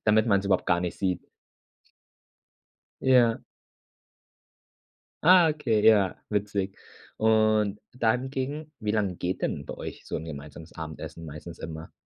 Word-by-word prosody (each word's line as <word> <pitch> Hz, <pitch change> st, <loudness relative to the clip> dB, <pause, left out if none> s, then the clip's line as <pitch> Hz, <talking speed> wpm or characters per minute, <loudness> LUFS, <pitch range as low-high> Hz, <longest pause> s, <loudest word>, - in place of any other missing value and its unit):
Damit 110 Hz, +1 st, +4 dB
man's 100 Hz, -3 st, +3 dB
überhaupt 95 Hz, -2 st, +1 dB
gar 85 Hz, 0 st, +3 dB
nicht 90 Hz, -1 st, -4 dB
sieht. 90 Hz, -2 st, -1 dB, 1.8 s
Ja. 120 Hz, -3 st, +4 dB, 1.8 s
Ah, 180 Hz, 0 st, +7 dB
okay, 115 Hz, -8 st, +1 dB
ja, 100 Hz, -4 st, +5 dB
witzig. 100 Hz, -2 st, -1 dB, 0.4 s
Und 110 Hz, -2 st, +3 dB
dann 125 Hz, +2 st, +1 dB
ging 145 Hz, +3 st, -4 dB
wie 105 Hz, -2 st, -1 dB
lang 100 Hz, -4 st, 0 dB
geht 90 Hz, +1 st, -2 dB
denn 70 Hz, -, -2 dB
bei -, -, -6 dB
euch -, -, -8 dB
so -, -, -4 dB
'n 80 Hz, -, -5 dB
gemeinsames 75 Hz, +1 st, -9 dB
Abendessen 80 Hz, +1 st, -7 dB
meistens 80 Hz, +2 st, -9 dB
immer? 80 Hz, 0 st, -7 dB
105 Hz, 130 wpm, -27 LUFS, 85-110 Hz, 1.8 s, Ah